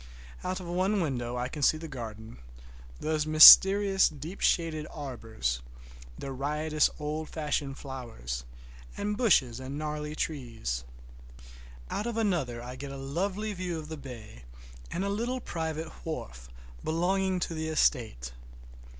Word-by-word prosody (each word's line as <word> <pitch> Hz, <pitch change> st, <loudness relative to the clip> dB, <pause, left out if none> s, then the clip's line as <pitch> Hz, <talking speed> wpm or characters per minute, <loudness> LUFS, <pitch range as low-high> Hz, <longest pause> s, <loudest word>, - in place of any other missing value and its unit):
Out 185 Hz, +1 st, -2 dB
of 185 Hz, -, -8 dB
one 185 Hz, +4 st, +1 dB
window 125 Hz, -7 st, -2 dB
I 125 Hz, +1 st, -1 dB
can 150 Hz, +3 st, -7 dB
see 155 Hz, -, +4 dB
the 165 Hz, +1 st, -7 dB
garden, 115 Hz, -5 st, -8 dB, 0.6 s
those 155 Hz, -1 st, -1 dB
mysterious 195 Hz, +5 st, +9 dB
deep 155 Hz, +5 st, -9 dB
shaded 160 Hz, -3 st, +1 dB
arbors, 115 Hz, -, -4 dB, 0.6 s
the 135 Hz, -, -6 dB
riotous 150 Hz, +3 st, +1 dB
old 155 Hz, +1 st, -4 dB
fashioned 150 Hz, -3 st, -2 dB
flowers, 115 Hz, -, -6 dB, 0.5 s
and 210 Hz, +1 st, -1 dB
bushes 145 Hz, -, +3 dB
and 130 Hz, +2 st, -6 dB
gnarly 150 Hz, 0 st, -4 dB
trees. 115 Hz, -, -3 dB, 1.1 s
Out 210 Hz, -, -2 dB
of 235 Hz, -1 st, -3 dB
another 160 Hz, -, 0 dB
I 125 Hz, +1 st, -7 dB
get 140 Hz, +1 st, -7 dB
a 140 Hz, -, -7 dB
lovely 190 Hz, +10 st, -2 dB
view 180 Hz, -3 st, -3 dB
of 155 Hz, -1 st, -8 dB
the 160 Hz, -, -4 dB
bay 120 Hz, -, -10 dB, 0.5 s
and 185 Hz, -, -2 dB
a -, -, -1 dB
little 235 Hz, +6 st, -1 dB
private 160 Hz, -5 st, -4 dB
wharf 60 Hz, -, -6 dB, 0.3 s
belonging 185 Hz, +3 st, +1 dB
to 170 Hz, -, -2 dB
the 160 Hz, 0 st, -3 dB
estate. 110 Hz, -, 0 dB
150 Hz, 140 wpm, -29 LUFS, 125-175 Hz, 1.1 s, mysterious